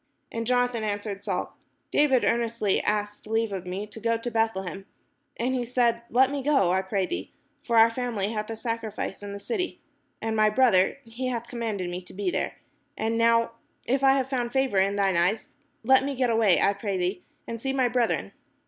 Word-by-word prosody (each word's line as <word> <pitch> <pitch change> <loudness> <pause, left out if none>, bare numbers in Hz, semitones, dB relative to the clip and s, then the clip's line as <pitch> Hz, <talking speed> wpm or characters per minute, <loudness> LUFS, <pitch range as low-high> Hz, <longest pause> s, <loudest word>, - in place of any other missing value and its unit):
And 230 0 -3
Jonathan 245 -2 +1
answered 205 -1 -3
Saul: 195 -4 -3 0.4
"David 270 -4 +3
earnestly 230 -4 +1
asked 210 0 -2
leave 225 -1 0
of 185 -2 -5
me 190 +3 -3
to 210 +1 -11
go 230 +1 +1
to 240 +1 -4
Beth 225 -1 +1
lehem: 190 +1 -6 0.5
and 250 +3 0
he 250 -2 0
said, 235 -1 +1
Let 260 +3 +4
me 285 -1 -2
go, 270 -10 +3
I 190 +1 +2
pray 190 0 -1
thee; 95 - -5 0.3
for 235 -5 0
our 225 +1 +7
family 230 -5 -2
hath 215 -1 -3
a 225 - -3
sacrifice 225 -4 -4
in 205 0 -6
the 200 - -6
city; 365 - -3 0.4
and 225 0 -2
my 215 0 +4
brother, 215 -4 +3
he 235 +3 -4
hath 240 -2 -3
commanded 220 -6 -3
me 180 +1 -4
to 180 - -14
be 195 -2 -1
there: - - -2 0.4
and 225 +1 0
now, 230 0 +3 0.3
if 265 +3 0
I 270 0 +7
have 265 -2 +1
found 245 -3 -2
favour 265 -6 +2
in 195 +1 +2
thine 195 -3 +2
eyes, 185 +6 +1 0.3
let 265 +3 +5
me 280 0 -2
get 250 -2 +1
away, 220 -5 +4
I 200 - +3
pray 200 -1 -3
thee, 180 +2 -1 0.3
and 230 -1 -5
see 270 - -1
my 265 -2 +2
brethren. 245 -1 0
225 Hz, 205 wpm, -26 LUFS, 200-245 Hz, 0.5 s, our